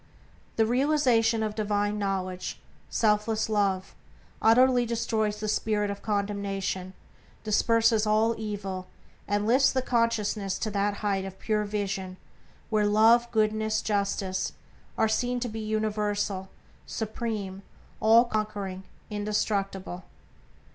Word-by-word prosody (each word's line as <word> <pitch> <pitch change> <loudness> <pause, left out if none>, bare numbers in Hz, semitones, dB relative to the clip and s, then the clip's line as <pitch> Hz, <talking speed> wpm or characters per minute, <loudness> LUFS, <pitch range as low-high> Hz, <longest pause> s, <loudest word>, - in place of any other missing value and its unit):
The 225 - +3
realization 240 -3 +2
of 215 -1 -2
divine 210 -1 0
knowledge, 185 -2 -3 0.3
selfless 215 0 +1
Love, 195 -3 0 0.5
utterly 245 +2 +5
destroys 220 -2 -1
the 215 - -3
spirit 210 -1 0
of 200 - -7
condemnation, 200 -2 -2 0.5
disperses 225 +1 +3
all 220 +2 +3
evil, 195 -4 -5 0.4
and 205 +1 0
lifts 255 +5 +4
the 260 -1 0
consciousness 220 -5 0
to 215 - -3
that 200 0 0
height 195 -2 +1
of 190 0 -7
pure 210 0 0
vision 195 -3 -3 0.5
where 210 -1 +3
Love, 225 +3 +5
Goodness, 215 -1 +1
Justice 200 -2 -1 0.4
are 220 - +3
seen 245 +3 0
to 245 - -2
be 225 -1 -5
universal, 210 -3 -1 0.4
supreme, 215 -3 -4 0.4
all 225 +2 +6
conquering, 205 -4 -3 0.3
indestructible. 200 -3 -2
210 Hz, 115 wpm, -27 LUFS, 200-225 Hz, 0.5 s, all